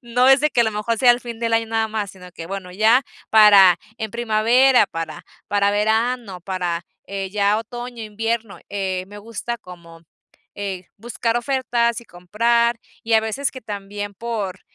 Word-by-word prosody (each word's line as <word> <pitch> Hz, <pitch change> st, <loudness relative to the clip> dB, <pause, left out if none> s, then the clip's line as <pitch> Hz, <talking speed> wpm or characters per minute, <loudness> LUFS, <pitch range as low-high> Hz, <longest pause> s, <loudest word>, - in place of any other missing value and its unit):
No 245 Hz, +2 st, +2 dB
es 270 Hz, +1 st, +6 dB
de 300 Hz, -, +2 dB
que 240 Hz, -, +3 dB
a -, -, +1 dB
lo 220 Hz, -, 0 dB
mejor 215 Hz, +2 st, -2 dB
sea 250 Hz, +1 st, +6 dB
el 240 Hz, -, -3 dB
fin 235 Hz, -2 st, -8 dB
del 230 Hz, 0 st, -1 dB
año 225 Hz, 0 st, +2 dB
nada 225 Hz, 0 st, 0 dB
más, 215 Hz, -2 st, -3 dB
sino 180 Hz, -2 st, -14 dB
que 165 Hz, -1 st, -8 dB
bueno, 190 Hz, -1 st, -6 dB
ya 220 Hz, +7 st, +4 dB, 0.3 s
para 200 Hz, -5 st, +7 dB, 0.2 s
en 220 Hz, -1 st, -4 dB
primavera 235 Hz, +3 st, +3 dB
para 165 Hz, -2 st, -6 dB, 0.2 s
para 200 Hz, 0 st, +2 dB
verano, 220 Hz, -1 st, 0 dB
para, 175 Hz, -2 st, -3 dB, 0.2 s
eh, 195 Hz, -1 st, -5 dB
ya 205 Hz, +1 st, +2 dB
otoño 240 Hz, +1 st, -7 dB
e 220 Hz, -, -5 dB
invierno, 225 Hz, 0 st, -3 dB
eh, 190 Hz, -2 st, -3 dB
me 205 Hz, +1 st, -11 dB
gusta 230 Hz, +2 st, -5 dB
como, 170 Hz, -3 st, -13 dB, 0.5 s
eh, 195 Hz, -3 st, -5 dB
buscar 230 Hz, +1 st, -2 dB
ofertas 240 Hz, -2 st, 0 dB
y -, -, -16 dB
comprar. 230 Hz, +6 st, 0 dB, 0.3 s
Y 225 Hz, -, -2 dB
a 220 Hz, -, +6 dB
veces 220 Hz, +6 st, -2 dB
que 260 Hz, -, -9 dB
también 205 Hz, -1 st, -6 dB
por, 205 Hz, -4 st, -4 dB
220 Hz, 185 wpm, -21 LUFS, 195-235 Hz, 0.5 s, para